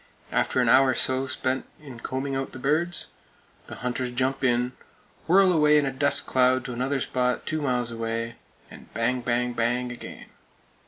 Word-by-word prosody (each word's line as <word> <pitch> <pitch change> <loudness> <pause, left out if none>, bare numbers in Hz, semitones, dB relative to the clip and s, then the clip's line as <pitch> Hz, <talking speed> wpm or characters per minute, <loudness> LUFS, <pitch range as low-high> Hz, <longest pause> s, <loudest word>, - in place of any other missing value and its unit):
After - - +1
an - - +3
hour 135 +1 +6
or 130 - +2
so 130 +2 +1
spent 130 0 -1
in 135 -6 -11
combing 135 +3 -3
out 135 0 -3
the - - -6
birds, 155 +7 0 0.6
the - - -8
hunters 125 0 -1
jump 130 +2 -1
in, 125 0 +2 0.6
whirl 185 +2 +5
away 150 -2 +5
in 145 - +3
a 135 - -1
dust 140 +1 +1
cloud 130 0 +2
to 125 - -5
another 130 +3 -1
spot 125 0 -1
two 155 0 -2
miles 125 -4 -1
away, 115 0 -3 0.3
and - - -14
"bang 125 +2 0
bang 120 0 0
bang" 120 +1 0
again. 120 - -10
130 Hz, 175 wpm, -26 LUFS, 125-135 Hz, 0.6 s, hour